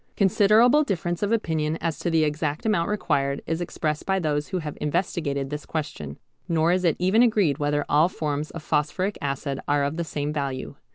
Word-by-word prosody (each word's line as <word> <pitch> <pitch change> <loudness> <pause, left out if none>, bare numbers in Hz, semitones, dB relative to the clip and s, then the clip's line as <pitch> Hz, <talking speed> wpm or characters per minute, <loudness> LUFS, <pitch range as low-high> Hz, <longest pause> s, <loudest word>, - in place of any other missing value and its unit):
Considerable 215 +8 +5
difference 175 - -2
of 205 +1 0
opinion 160 -8 0
as 165 -1 -2
to 175 - -1
the 165 -1 +3
exact 150 +1 -2
amount 190 -6 +1
required 140 -9 0
is 165 +2 -2
expressed 155 -3 -2
by 190 0 0
those 150 -4 -1
who 185 - -2
have 155 -4 -5
investigated 150 -3 -1
this 150 0 -4
question, 75 - -5 0.3
nor 165 0 +3
is 185 +1 +1
it 165 -4 +3
even 190 +6 +3
agreed 205 - +3
whether 145 0 0
all 155 +4 +4
forms 150 -3 -3
of 165 - -8
phosphoric 185 +8 0
acid 140 -1 -3
are 145 0 +2
of 145 +3 -2
the 170 - -1
same 150 -2 -3
value. 140 -3 -3
160 Hz, 190 wpm, -25 LUFS, 145-185 Hz, 0.3 s, Considerable